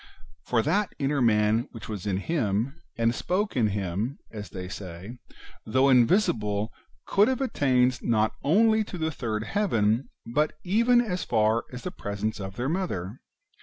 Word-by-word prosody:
For 115 Hz, -2 st, +2 dB
that 205 Hz, -, 0 dB
inner 140 Hz, 0 st, 0 dB
man 110 Hz, 0 st, +3 dB
which 115 Hz, -, -9 dB
was 105 Hz, -2 st, -5 dB
in 95 Hz, -2 st, 0 dB
him, 115 Hz, -, -1 dB, 0.2 s
and 115 Hz, 0 st, +2 dB
spoke 190 Hz, -, -1 dB
in 120 Hz, -4 st, +3 dB
him, 100 Hz, +5 st, -2 dB
as 105 Hz, -4 st, -7 dB
they 90 Hz, +1 st, -6 dB
say, 95 Hz, +4 st, -8 dB, 0.4 s
though 130 Hz, +5 st, +3 dB
invisible, 115 Hz, -, +2 dB, 0.3 s
could 205 Hz, +2 st, +4 dB
have 260 Hz, -1 st, 0 dB
attained 130 Hz, -, +2 dB
not 110 Hz, -2 st, +1 dB
only 220 Hz, +8 st, +4 dB
to 185 Hz, -, -7 dB
the 160 Hz, -1 st, -1 dB
third 110 Hz, -6 st, -3 dB
heaven, 115 Hz, -, +1 dB, 0.2 s
but 150 Hz, +6 st, 0 dB
even 235 Hz, +6 st, +4 dB
as 185 Hz, -6 st, -2 dB
far 110 Hz, 0 st, +2 dB
as 125 Hz, -1 st, -8 dB
the -, -, -4 dB
presence 105 Hz, +2 st, -4 dB
of 95 Hz, -1 st, -6 dB
their 125 Hz, +3 st, -2 dB
Mother. 130 Hz, -, -3 dB
120 Hz, 160 wpm, -27 LUFS, 105-160 Hz, 0.4 s, could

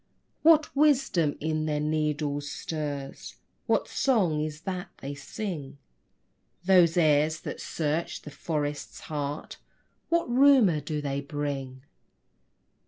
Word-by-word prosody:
What 310 Hz, -2 st, +5 dB
wisdom 270 Hz, -, +3 dB
in 155 Hz, 0 st, -1 dB
their 150 Hz, -1 st, 0 dB
needles 150 Hz, -1 st, -1 dB
stirs? 145 Hz, -3 st, -5 dB, 0.3 s
What -, -, +2 dB
song 190 Hz, -, +1 dB
is 155 Hz, 0 st, -5 dB
that 185 Hz, 0 st, -4 dB
they 140 Hz, +1 st, -6 dB
sing? 145 Hz, -1 st, -6 dB, 0.9 s
Those 180 Hz, -3 st, +5 dB
airs 155 Hz, -1 st, +3 dB
that -, -, -6 dB
search 160 Hz, +1 st, -2 dB
the 150 Hz, -, -9 dB
forest's 145 Hz, -1 st, -4 dB
heart, 145 Hz, -1 st, -5 dB, 0.5 s
What 340 Hz, 0 st, +2 dB
rumor 245 Hz, -, +5 dB
do 150 Hz, +1 st, -3 dB
they 140 Hz, -1 st, -2 dB
bring? 140 Hz, -3 st, -4 dB
155 Hz, 110 wpm, -27 LUFS, 145-180 Hz, 0.9 s, What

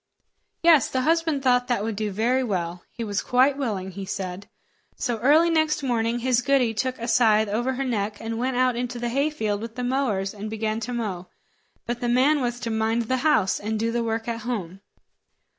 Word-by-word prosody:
Yes, 325 Hz, -6 st, +6 dB
the 260 Hz, -, 0 dB
husband 320 Hz, -1 st, +1 dB
thought 250 Hz, -1 st, +3 dB
that 240 Hz, -5 st, 0 dB
would 220 Hz, -1 st, -2 dB
do 215 Hz, +1 st, -2 dB
very 235 Hz, +6 st, +1 dB
well. 180 Hz, -6 st, -3 dB
He 235 Hz, -, -6 dB
was 205 Hz, -3 st, -2 dB
quite 260 Hz, +3 st, +3 dB
willing, 205 Hz, -9 st, -3 dB
he 195 Hz, +1 st, -7 dB
said. 190 Hz, 0 st, -5 dB, 0.5 s
So 235 Hz, -2 st, -2 dB
early 310 Hz, +8 st, +4 dB
next 315 Hz, -2 st, +1 dB
morning 235 Hz, -2 st, 0 dB
his 245 Hz, 0 st, +1 dB
goody 250 Hz, -2 st, +2 dB
took 255 Hz, +4 st, -2 dB
a 235 Hz, -, -5 dB
scythe 220 Hz, -3 st, +4 dB
over 240 Hz, +6 st, -1 dB
her 265 Hz, +2 st, -2 dB
neck, 210 Hz, -4 st, -2 dB
and 225 Hz, 0 st, -4 dB
went 255 Hz, 0 st, -1 dB
out 255 Hz, -1 st, +2 dB
into 245 Hz, 0 st, -3 dB
the 240 Hz, 0 st, -2 dB
hayfield 235 Hz, -6 st, -1 dB
with 225 Hz, 0 st, -7 dB
the 250 Hz, -, -4 dB
mowers 245 Hz, -7 st, 0 dB
and 210 Hz, +1 st, -6 dB
began 220 Hz, 0 st, -2 dB
to 240 Hz, +2 st, -5 dB
mow; 195 Hz, -7 st, -4 dB, 0.6 s
but 240 Hz, +1 st, -4 dB
the 240 Hz, -, 0 dB
man 270 Hz, +5 st, +3 dB
was 240 Hz, -1 st, -2 dB
to 230 Hz, -, -3 dB
mind 220 Hz, +1 st, +1 dB
the 260 Hz, +3 st, -1 dB
house, 255 Hz, -9 st, +2 dB
and 215 Hz, +1 st, -3 dB
do 230 Hz, +1 st, 0 dB
the 235 Hz, 0 st, -1 dB
work 225 Hz, 0 st, -2 dB
at 230 Hz, -1 st, -2 dB
home. 195 Hz, -6 st, -4 dB
235 Hz, 210 wpm, -24 LUFS, 215-255 Hz, 0.6 s, Yes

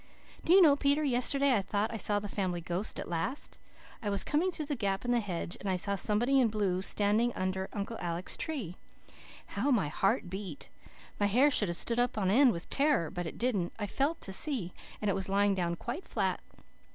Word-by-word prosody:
"Do -, -, 0 dB
you 380 Hz, +1 st, +8 dB
know, 290 Hz, -4 st, +6 dB
Peter, 285 Hz, +2 st, +2 dB
yesterday 275 Hz, 0 st, +3 dB
I 205 Hz, -, +2 dB
thought 205 Hz, +3 st, -2 dB
I -, -, -3 dB
saw 205 Hz, 0 st, +1 dB
the 205 Hz, 0 st, -3 dB
Family 185 Hz, -3 st, -2 dB
Ghost 175 Hz, +4 st, -3 dB
at -, -, -5 dB
last. 175 Hz, -, -4 dB, 0.4 s
I 210 Hz, -, -2 dB
was 200 Hz, -1 st, +2 dB
coming 325 Hz, +5 st, +1 dB
through 315 Hz, -4 st, -5 dB
the 290 Hz, 0 st, -2 dB
gap 200 Hz, -2 st, -2 dB
in 245 Hz, -, 0 dB
the 240 Hz, -, +3 dB
hedge, 180 Hz, -5 st, -4 dB
and 200 Hz, -, -4 dB
I 185 Hz, -, +1 dB
saw 200 Hz, +3 st, -1 dB
somebody 230 Hz, +7 st, +2 dB
in 245 Hz, -, +4 dB
blue 200 Hz, -4 st, -1 dB
standing 210 Hz, +4 st, +1 dB
under 185 Hz, 0 st, -2 dB
Uncle 210 Hz, +3 st, -5 dB
Alec's 175 Hz, +1 st, -1 dB
tree. 245 Hz, -, -4 dB, 0.7 s
How 230 Hz, +8 st, -2 dB
my 210 Hz, -, +2 dB
heart 195 Hz, +3 st, 0 dB
beat! 185 Hz, -5 st, -7 dB, 0.5 s
My 205 Hz, -, +3 dB
hair 255 Hz, +8 st, +4 dB
should 210 Hz, -6 st, +1 dB
have 170 Hz, 0 st, +1 dB
stood 235 Hz, 0 st, +1 dB
up 245 Hz, -2 st, 0 dB
on 190 Hz, -3 st, +1 dB
end 255 Hz, +3 st, +6 dB
with 170 Hz, -3 st, -6 dB
terror 280 Hz, -, +2 dB
but 175 Hz, -3 st, -4 dB
it -, -, -7 dB
didn't. 215 Hz, -8 st, -1 dB
I 210 Hz, -, -3 dB
felt 280 Hz, +10 st, -1 dB
to 195 Hz, -, -3 dB
see, 215 Hz, -, +1 dB, 0.3 s
and 210 Hz, -, -1 dB
it 200 Hz, -, +2 dB
was 190 Hz, 0 st, -1 dB
lying 200 Hz, +1 st, +3 dB
down 175 Hz, -3 st, -1 dB
quite 250 Hz, -, -6 dB
flat. -, -, -1 dB
205 Hz, 220 wpm, -31 LUFS, 185-255 Hz, 0.7 s, you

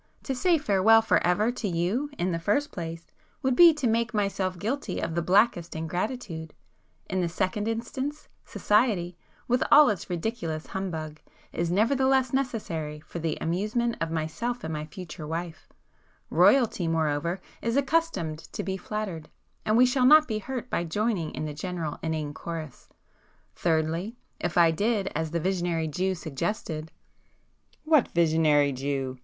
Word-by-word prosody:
To 270 Hz, -, -2 dB
say 335 Hz, +7 st, +3 dB
farewell 225 Hz, -4 st, +4 dB
for -, -, +2 dB
ever 205 Hz, +6 st, +2 dB
to 245 Hz, -3 st, -4 dB
you, 190 Hz, -, -1 dB
in 180 Hz, +1 st, 0 dB
the 165 Hz, -, -1 dB
first 285 Hz, -, 0 dB
place, 165 Hz, -1 st, -6 dB, 0.4 s
would 260 Hz, -1 st, +2 dB
be 340 Hz, +4 st, +9 dB
to 295 Hz, -4 st, -3 dB
make 230 Hz, 0 st, +1 dB
myself 195 Hz, -3 st, -1 dB
guilty 220 Hz, 0 st, -3 dB
of -, -, -3 dB
the 170 Hz, -, 0 dB
blackest 180 Hz, -2 st, +2 dB
ingratitude,—in 175 Hz, 0 st, -5 dB
the 175 Hz, -, 0 dB
second 190 Hz, +5 st, -1 dB
instance, 260 Hz, +6 st, -4 dB, 0.2 s
society, 205 Hz, -6 st, +1 dB, 0.3 s
with 250 Hz, +1 st, +2 dB
all 295 Hz, -2 st, +8 dB
its 200 Hz, -3 st, -3 dB
ridiculous 170 Hz, -4 st, -3 dB
humbug, 160 Hz, -5 st, -5 dB, 0.3 s
is 170 Hz, 0 st, -1 dB
nevertheless 260 Hz, +6 st, +2 dB
necessary 170 Hz, -, -2 dB
for 170 Hz, -, -8 dB
the 160 Hz, -1 st, -2 dB
amusement 215 Hz, +8 st, -1 dB
of 165 Hz, -, 0 dB
myself 165 Hz, +10 st, -3 dB
and 160 Hz, -, -4 dB
my 150 Hz, 0 st, -4 dB
future 160 Hz, -2 st, -8 dB
wife,—Royalty 175 Hz, -, 0 dB
moreover, 165 Hz, +2 st, 0 dB, 0.2 s
is 230 Hz, +3 st, 0 dB
accustomed 280 Hz, -, 0 dB
to -, -, -3 dB
be 190 Hz, +1 st, -3 dB
flattered, 190 Hz, -6 st, -5 dB, 0.4 s
and 215 Hz, +1 st, +3 dB
we 250 Hz, -, +7 dB
shall 250 Hz, 0 st, +3 dB
not 305 Hz, +2 st, +7 dB
be 215 Hz, -2 st, -2 dB
hurt 250 Hz, +3 st, -5 dB
by -, -, 0 dB
joining 185 Hz, -1 st, -1 dB
in 155 Hz, -, -3 dB
the 150 Hz, -, -4 dB
general 165 Hz, -1 st, -4 dB
inane 155 Hz, -2 st, -3 dB
chorus;—thirdly, 165 Hz, -, -4 dB, 0.2 s
if 175 Hz, 0 st, -2 dB
I 170 Hz, -1 st, +6 dB
did 205 Hz, +3 st, 0 dB
as 160 Hz, 0 st, -2 dB
the 170 Hz, +2 st, -1 dB
visionary 175 Hz, -2 st, -1 dB
Jew 185 Hz, +5 st, -1 dB
suggested——" 160 Hz, 0 st, -4 dB, 0.9 s
"What 310 Hz, -4 st, +4 dB
visionary 155 Hz, -4 st, +3 dB
Jew?" 135 Hz, -1 st, -3 dB
180 Hz, 150 wpm, -27 LUFS, 160-230 Hz, 0.9 s, be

